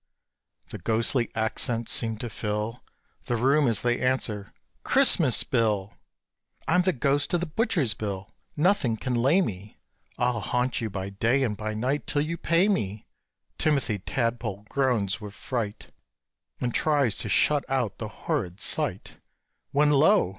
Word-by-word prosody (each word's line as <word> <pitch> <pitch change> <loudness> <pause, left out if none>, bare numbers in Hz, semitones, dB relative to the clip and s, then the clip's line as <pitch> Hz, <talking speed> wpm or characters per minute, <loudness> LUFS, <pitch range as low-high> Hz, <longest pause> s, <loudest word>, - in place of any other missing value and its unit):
The - - -7
ghostly 115 +2 +1
accents 115 +1 -1
seem 110 -2 0
to 120 +2 -5
fill 105 +3 -3 0.4
The 120 - -1
room 135 +4 +3
as 115 -4 +2
they 120 0 +1
answer, 110 -6 -1 0.3
"Christmas - - +4
Bill! 105 -4 0 0.7
I'm 180 +2 +4
the 185 +1 +2
ghost 145 +3 +1
of - - +2
the 175 - -2
butcher's 170 - +1
bill! 100 -3 -5 0.2
nothing 150 - +2
can 125 +3 -3
lay 135 +10 +3
me: 105 - -5 0.4
I'll 120 -1 +1
haunt 125 +5 -1
you 110 - -2
by 95 0 -5
day 115 +7 +1
and 110 -5 -1
by 110 +1 -4
night 130 +6 -1
till 145 - +1
you 165 +2 -3
pay 170 +3 +2
me!" 105 - -1 0.5
Timothy 140 -9 +1
Tadpole 115 -3 -2
groans 115 -6 0
with 105 -1 -8
fright, 115 -6 -4 0.7
And 120 -1 -2
tries 140 -8 +2
to 105 - -3
shut 145 +8 +3
out 130 -6 -1
the - - -4
horrid 90 +2 -3
sight, - - -2 0.5
When 145 +1 +3
lo! 140 - +4
120 Hz, 150 wpm, -26 LUFS, 105-140 Hz, 0.7 s, Christmas